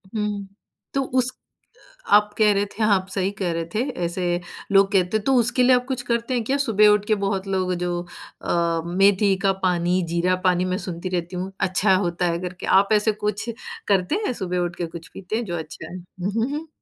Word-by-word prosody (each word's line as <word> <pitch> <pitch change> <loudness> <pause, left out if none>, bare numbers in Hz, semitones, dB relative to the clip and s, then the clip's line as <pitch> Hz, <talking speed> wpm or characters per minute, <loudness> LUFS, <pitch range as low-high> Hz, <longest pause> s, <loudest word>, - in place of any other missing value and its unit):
हुँ, 210 -2 -2 0.5
तो 275 - +1
उस 255 -1 +2 0.5
अ, - - -22 0.3
आप 210 0 +3
कह 215 -1 +5
रहे 200 +1 +1
थे, 215 +2 -4
आप 195 -3 +2
सही 195 +1 0
कह 180 -3 0
रहे 165 0 -2
थे, 215 - 0 0.3
ऐसे 175 0 -1 0.3
लोग 195 0 +5
कहते 190 +1 +2
हैं 210 - -6
तो 270 - +3
उसके 245 +2 +2
लिए 255 +1 +6
आप 250 0 0
कुछ 260 -2 -2
करते 235 +1 -1
हैं 240 -2 0
क्या? 270 +5 0
सुबह 215 -6 +4
उठ 210 0 +3
के 215 - +3
बहुत 195 -1 -1
लोग 185 -1 0
जो 175 0 -1 0.4
अ, 170 -1 0
मेथी 195 +2 +3
का 195 - +4
पानी, 180 +1 +2
जीरा 175 +2 +1
पानी 180 0 +2
मैं 185 0 -1
सुनती 175 +1 -4
रहती 175 0 -3
हूँ, 185 +2 -4
अच्छा 190 +1 +3
होता 175 -1 0
है 170 - -2
करके 180 0 -6 0.2
आप 200 +2 -1
ऐसे 210 +1 +3
कुछ 210 +2 -2 0.4
करते 195 - +2
हैं - - 0
सुबह 180 -1 -1
उठ 175 0 -2
के 175 - -3
कुछ 165 - -8
पीते 195 +3 -5
हैं 235 0 -1
जो 175 -2 -3
अच्छा 160 0 -8
है? 180 - -6
हुँ, 180 +2 -6
हुँ, 230 +5 -1
हुँ। 305 +2 -4
195 Hz, 220 wpm, -23 LUFS, 180-215 Hz, 0.5 s, लिए